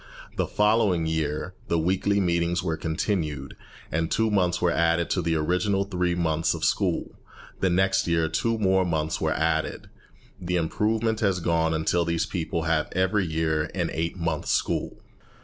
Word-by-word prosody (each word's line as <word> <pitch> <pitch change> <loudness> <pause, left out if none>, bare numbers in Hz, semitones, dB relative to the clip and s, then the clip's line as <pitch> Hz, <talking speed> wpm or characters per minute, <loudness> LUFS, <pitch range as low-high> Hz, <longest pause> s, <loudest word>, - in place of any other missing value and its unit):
The - - 0
following 105 -5 +2
year 80 +2 -2
the 85 - +1
weekly 95 +4 +1
meetings 85 -1 +1
were 80 -3 -1
continued, 80 -4 -2 0.4
and 80 +1 0
two 110 -1 +1
months 90 -4 +2
were 90 -1 +2
added 85 +1 +1
to 90 - +1
the 85 -1 0
original 90 +5 +1
three 90 -3 -1
months 80 -2 +1
of - - -6
school. - - 0 0.5
The 95 - +2
next 95 +2 +2
year 85 -1 +2
two 115 +9 0
more 95 -3 +3
months 80 -3 -1
were - - +1
added. - - -1 0.5
The 90 0 -2
improvement 110 +6 0
has 95 -4 +1
gone 80 -1 +1
on 80 - -1
until 85 +2 +1
these 85 0 0
people 85 -2 -3
have 80 -1 0
every 95 +1 +1
year 80 -1 0
an 85 -3 -1
eight 85 +3 -2
months' 85 -3 -2
school. - - -1
85 Hz, 165 wpm, -25 LUFS, 80-95 Hz, 0.5 s, more